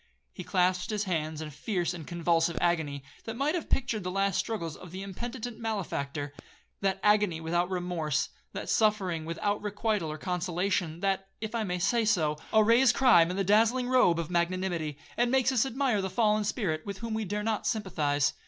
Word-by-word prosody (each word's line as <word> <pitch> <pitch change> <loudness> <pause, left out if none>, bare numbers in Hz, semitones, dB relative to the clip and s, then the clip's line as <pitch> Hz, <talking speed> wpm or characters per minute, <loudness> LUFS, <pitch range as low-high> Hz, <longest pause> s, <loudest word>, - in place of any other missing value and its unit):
He - - -7
clasped 180 0 +1
his 210 -1 -1
hands 160 -4 -2
with 150 -1 -8
a - - -16
fierce 175 +1 -1
and 165 -4 -8
convulsive 170 -1 +1
agony, 155 -5 0 0.2
that 225 - -4
might 280 +5 0
have 345 -3 -3
pictured 235 -6 0
the 180 - -2
last 195 0 +1
struggles 170 -9 -3
of 180 - -11
the 190 +3 -6
impenitent 235 +4 -6
malefactor,—that 185 -2 -4
agony 210 -5 +3
without 175 +2 0
remorse, 175 -5 -1 0.2
that - - -6
suffering 195 -7 +1
without 205 +5 -1
requital 205 -5 -1
or 155 - -5
consolation, 180 0 -1
that, 195 -1 0
if 220 +1 -5
I 230 -1 0
may 180 -3 -2
say 230 +6 +2
so, 160 -9 +2
arrays 230 +4 +5
crime 235 -10 +5
in 180 - -3
the 195 - +1
dazzling 225 +6 +3
robe 250 -10 +4
of 170 +1 -3
magnanimity, 170 -3 -1 0.2
and 240 0 +3
makes 260 0 +3
us 260 0 +2
admire 255 -4 +1
the 190 - -2
fallen 210 +1 +2
spirit, 185 -8 -1
with 200 -1 -6
whom 230 +1 -4
we 220 0 -1
dare 210 +1 -3
not 220 -1 -1
sympathize. 150 -9 0
190 Hz, 185 wpm, -29 LUFS, 170-220 Hz, 0.2 s, arrays